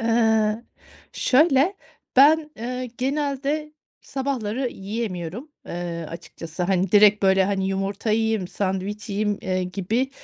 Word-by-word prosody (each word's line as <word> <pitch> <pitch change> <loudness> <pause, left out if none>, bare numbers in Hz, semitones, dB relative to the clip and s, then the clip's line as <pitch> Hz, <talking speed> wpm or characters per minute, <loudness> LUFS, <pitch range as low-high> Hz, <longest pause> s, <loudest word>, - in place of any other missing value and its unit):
Eee. 225 -1 +2 0.5
Şöyle, 295 +6 +3 0.4
ben, 300 +3 +6
eee, 250 +3 -4
genelde 285 +2 -1 0.3
sabahları 260 -2 -2
yiyemiyorum, 200 - -5 0.2
eee, 170 -2 -4
açıkçası. 165 +1 -7
Hani 185 +1 +1
direkt 210 0 +6
böyle, 190 0 +4
hani, 195 -1 0
yumurta 195 +3 -2
yiyeyim, 220 -4 +1
sandviç 200 +2 -3
yiyeyim, 205 0 -1
eee, 185 -1 -1
gibi, 205 +8 -1
215 Hz, 110 wpm, -24 LUFS, 190-255 Hz, 0.5 s, ben